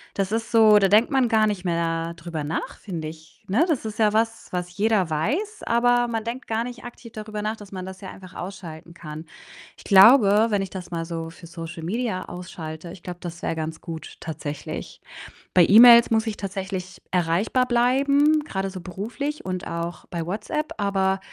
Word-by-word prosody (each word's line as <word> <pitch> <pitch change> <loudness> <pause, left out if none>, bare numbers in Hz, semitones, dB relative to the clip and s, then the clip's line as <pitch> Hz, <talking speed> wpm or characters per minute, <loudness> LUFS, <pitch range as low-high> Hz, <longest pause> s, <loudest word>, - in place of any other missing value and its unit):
Das 195 0 -1
ist 225 0 -2
so 220 -2 +7
da 195 - +4
denkt 215 +7 +4
man 265 -3 +3
gar 220 -2 +4
nicht 200 -3 -2
mehr 165 -1 -1
drüber 165 -2 -5
nach, 155 +3 -4
finde 165 -6 -5
ich, 160 0 -15
ne? 240 - +3
Das 290 -9 -1
ist 215 0 -6
ja 210 -1 +3
was, 225 +1 0
was 180 -1 -4
jeder 205 -5 +2
weiß, 315 - -1
aber 240 +1 +3
man 225 -2 -2
denkt 235 +3 -6
gar 225 +1 -1
nicht 245 -2 -8
aktiv 235 -1 -11
darüber 215 -1 -6
nach, 215 +1 -1
dass 205 -2 -13
man 185 -1 -6
das 190 +1 -9
ja 190 - -7
einfach 185 -1 -13
ausschalten 170 -3 -8
kann. 155 -1 -8 0.5
Ich - - -15
glaube, 210 +1 +7
wenn 205 -2 +1
ich 190 - -6
das 185 -2 -7
mal 165 -1 -3
so 165 -1 -5
für 170 - -14
Social 165 -1 -8
Media 210 0 -2
ausschalte, 170 -2 -8
ich 175 - -14
glaube, 175 -1 -7
das 170 0 -7
wäre 165 - -1
ganz 160 0 -4
gut 160 -2 -8
tatsächlich. 150 -2 -6 0.5
Bei 175 -2 +7
E-Mails 235 +2 +9
muss 220 0 +2
ich 215 - -3
tatsächlich 190 -2 -5
erreichbar 180 +8 +1
bleiben, 280 +5 +3
grade 195 -8 -3
so 185 -2 -8
beruflich 235 - -5
und 185 -1 -4
auch 170 +1 -5
bei 170 -2 -4
WhatsApp, 215 - -3
aber, 195 -1 +1
195 Hz, 195 wpm, -24 LUFS, 170-225 Hz, 0.5 s, E-Mails